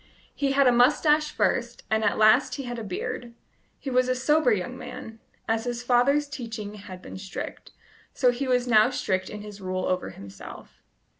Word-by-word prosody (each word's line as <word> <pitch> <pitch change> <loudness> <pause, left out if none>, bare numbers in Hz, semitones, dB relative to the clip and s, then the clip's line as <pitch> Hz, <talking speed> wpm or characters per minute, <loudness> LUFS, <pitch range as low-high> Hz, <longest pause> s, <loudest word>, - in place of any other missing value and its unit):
He 275 -1 0
had 280 0 +4
a 250 - +6
moustache 295 +5 +4
first, 240 -1 -1
and 220 0 +2
at 205 - +2
last 220 +6 +5
he 275 - -5
had 240 -2 -5
a - - -5
beard. 235 +4 -5 0.4
He 270 - -6
was 255 0 +2
a 255 - +2
sober 280 +1 +3
young 185 -5 -1
man: 225 0 -9 0.3
as 225 +1 0
his 240 0 -3
father's 260 +4 +3
teaching 225 -7 -6
had 195 -3 -10
been - - -8
strict, 195 0 -7 0.4
so 250 -3 +3
he 255 +3 -3
was 250 -1 +2
now 220 0 +5
strict 185 -7 -1
in 210 - -7
his 205 -1 -10
rule 185 0 -2
over 185 0 -1
himself. 100 0 -11
240 Hz, 190 wpm, -26 LUFS, 210-255 Hz, 0.4 s, a